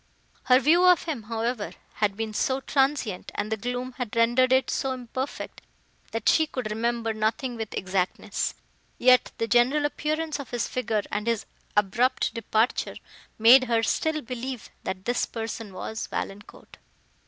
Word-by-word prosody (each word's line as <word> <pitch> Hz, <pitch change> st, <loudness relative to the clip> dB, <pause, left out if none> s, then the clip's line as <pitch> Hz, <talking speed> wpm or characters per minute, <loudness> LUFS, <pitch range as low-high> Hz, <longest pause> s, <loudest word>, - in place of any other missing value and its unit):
Her 255 Hz, 0 st, +6 dB
view 325 Hz, +6 st, +4 dB
of 360 Hz, -2 st, +6 dB
him, 305 Hz, -8 st, -3 dB
however, 230 Hz, -1 st, -2 dB, 0.2 s
had 205 Hz, -2 st, +1 dB
been 220 Hz, -1 st, -3 dB
so 260 Hz, +5 st, 0 dB
transient, 270 Hz, -8 st, 0 dB
and 215 Hz, -, -3 dB
the -, -, +2 dB
gloom 245 Hz, +3 st, -4 dB
had 240 Hz, -3 st, -4 dB
rendered 240 Hz, +3 st, +4 dB
it 260 Hz, 0 st, +3 dB
so 270 Hz, -1 st, -1 dB
imperfect, 255 Hz, +2 st, -5 dB, 0.5 s
that 225 Hz, -1 st, -3 dB
she 315 Hz, -1 st, +5 dB
could 250 Hz, -7 st, -4 dB
remember 230 Hz, +1 st, -1 dB
nothing 220 Hz, +4 st, -1 dB
with 220 Hz, -2 st, -5 dB
exactness; 185 Hz, -1 st, -1 dB, 0.4 s
yet 250 Hz, 0 st, +5 dB
the 230 Hz, -, -1 dB
general 245 Hz, +5 st, +3 dB
appearance 305 Hz, +1 st, -2 dB
of 280 Hz, -, -7 dB
his 240 Hz, -1 st, -1 dB
figure, 225 Hz, -5 st, -1 dB
and 210 Hz, +2 st, -2 dB
his 230 Hz, -2 st, 0 dB, 0.3 s
abrupt 240 Hz, +5 st, +2 dB
departure, 230 Hz, 0 st, 0 dB, 0.4 s
made 245 Hz, +4 st, +8 dB
her 230 Hz, -2 st, +1 dB
still 310 Hz, +5 st, 0 dB
believe, 250 Hz, 0 st, -6 dB
that 190 Hz, 0 st, -4 dB
this 245 Hz, 0 st, 0 dB
person 225 Hz, -2 st, -5 dB
was 220 Hz, +4 st, -5 dB
Valancourt. 200 Hz, +1 st, -7 dB
240 Hz, 155 wpm, -26 LUFS, 220-260 Hz, 0.5 s, made